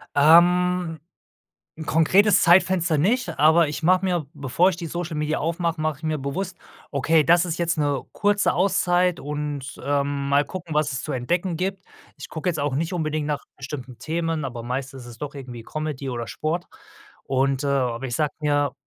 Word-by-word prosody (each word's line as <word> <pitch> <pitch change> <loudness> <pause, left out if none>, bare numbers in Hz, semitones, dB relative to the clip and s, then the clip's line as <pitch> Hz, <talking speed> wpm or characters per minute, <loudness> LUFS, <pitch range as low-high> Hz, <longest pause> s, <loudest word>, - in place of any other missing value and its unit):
Ähm, 175 +2 +4 0.8
'n 160 - -7
konkretes 190 +7 +4
Zeitfenster 175 -2 +4
nicht, 190 - 0
aber 160 +1 +5
ich 155 - -5
mache 185 +2 +4
mir 175 -5 0
bevor 145 +6 +2
ich 185 - -3
die 170 -1 -6
Social 170 0 -4
Media 150 +1 -1
aufmache, 165 0 -1
mache 155 -3 -1
ich - - -23
mir 155 -1 -1
bewusst: 170 +7 -4 0.3
„Okay, 155 +3 +3
das 175 +3 +4
ist 165 -2 -3
jetzt 170 -1 0
'ne 145 -3 0
kurze 205 -1 +2
Auszeit 180 -2 +2
und, 145 -2 -5
äh, 140 0 +1
mal 140 0 +1
gucken, 170 -4 -7
was 150 -1 +1
es 130 -1 -4
zu - - -4
entdecken 170 +8 -1
gibt.“ 190 +2 -3 0.3
Ich - - -8
gucke 165 +3 -2
jetzt 155 -4 -2
auch 145 -2 -1
nicht 165 +5 -1
unbedingt 155 -3 -2
nach 145 -2 -3
bestimmten 130 -3 -7
Themen, 165 +2 -2
aber 120 -3 -6
meistens 130 +2 -4
ist 120 - -12
es 115 - -13
doch 145 -1 -6
irgendwie 125 -4 -8
Comedy 150 -1 -4
oder 120 -2 -4
Sport 155 - -3 0.6
und, 135 +1 0
äh - - -1
aber 130 -2 0
ich 120 - -3
sage 150 -2 0
mir: 145 -1 +1
155 Hz, 190 wpm, -23 LUFS, 140-175 Hz, 0.8 s, aber